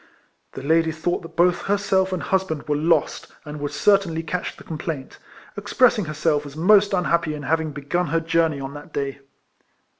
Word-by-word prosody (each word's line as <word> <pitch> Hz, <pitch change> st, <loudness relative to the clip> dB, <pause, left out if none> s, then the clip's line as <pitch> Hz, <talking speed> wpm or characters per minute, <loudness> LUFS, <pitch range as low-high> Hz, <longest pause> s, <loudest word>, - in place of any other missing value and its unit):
The -, -, -7 dB
lady 160 Hz, +2 st, +2 dB
thought 160 Hz, +3 st, -2 dB
that 165 Hz, -, -12 dB
both 175 Hz, 0 st, +3 dB
herself 195 Hz, -1 st, +1 dB
and 180 Hz, -5 st, -3 dB
husband 190 Hz, -3 st, -1 dB
were 150 Hz, -, +1 dB
lost, 160 Hz, +3 st, +1 dB, 0.2 s
and 150 Hz, 0 st, -7 dB
would 145 Hz, 0 st, -3 dB
certainly 195 Hz, -6 st, +2 dB
catch 175 Hz, +3 st, -4 dB
the -, -, -13 dB
com 160 Hz, -2 st, -7 dB
plaint; 145 Hz, -6 st, -5 dB, 0.4 s
expressing 245 Hz, -6 st, +2 dB
herself 155 Hz, -1 st, 0 dB
as 140 Hz, -, -11 dB
most 200 Hz, +4 st, +5 dB
unhappy 170 Hz, -4 st, +1 dB
in 150 Hz, -, -7 dB
having 160 Hz, +2 st, 0 dB
begun 150 Hz, +5 st, -2 dB
her 165 Hz, -, +1 dB
journey 165 Hz, -2 st, +1 dB
on 135 Hz, 0 st, -6 dB
that 145 Hz, 0 st, -11 dB
day. 140 Hz, -1 st, -3 dB
165 Hz, 180 wpm, -23 LUFS, 150-180 Hz, 0.4 s, most